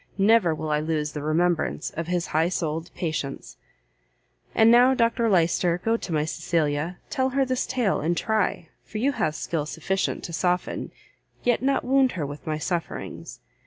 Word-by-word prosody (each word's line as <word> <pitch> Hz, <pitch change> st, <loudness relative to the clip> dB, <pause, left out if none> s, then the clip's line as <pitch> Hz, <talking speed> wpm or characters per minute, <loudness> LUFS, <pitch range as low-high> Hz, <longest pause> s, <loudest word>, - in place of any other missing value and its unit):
never 200 Hz, -5 st, +4 dB
will 155 Hz, 0 st, -4 dB
I 150 Hz, -, +2 dB
lose 155 Hz, -1 st, -1 dB
the 150 Hz, -, -5 dB
remembrance 160 Hz, +1 st, 0 dB
of 165 Hz, 0 st, -5 dB
his 175 Hz, -1 st, 0 dB
high 160 Hz, +2 st, +3 dB
souled 165 Hz, -2 st, -2 dB
patience. 155 Hz, -5 st, -4 dB, 1.0 s
"And 225 Hz, +1 st, +6 dB
now, 250 Hz, +2 st, +6 dB
Dr 230 Hz, -1 st, +2 dB
Lyster, 175 Hz, -1 st, +2 dB
go 225 Hz, 0 st, +3 dB
to 195 Hz, -, -5 dB
my 150 Hz, -1 st, +1 dB
Cecilia; 160 Hz, 0 st, -1 dB
tell 260 Hz, -2 st, +1 dB
her 270 Hz, +1 st, +1 dB
this 255 Hz, -1 st, -1 dB
tale, 245 Hz, -6 st, +1 dB
and 165 Hz, +3 st, 0 dB
try, 210 Hz, -6 st, 0 dB
for 215 Hz, -, -7 dB
you 260 Hz, +6 st, +2 dB
have 155 Hz, -, -1 dB
skill 155 Hz, -2 st, -2 dB
sufficient, 190 Hz, +5 st, -2 dB
to 170 Hz, -, -6 dB
soften, 180 Hz, +3 st, -1 dB, 0.5 s
yet 240 Hz, -2 st, +2 dB
not 275 Hz, +1 st, +1 dB
wound 265 Hz, 0 st, +3 dB
her 165 Hz, -5 st, -2 dB
with 145 Hz, +2 st, -8 dB
my 155 Hz, -1 st, -1 dB
sufferings. 170 Hz, +1 st, -4 dB
175 Hz, 170 wpm, -25 LUFS, 155-230 Hz, 1.0 s, And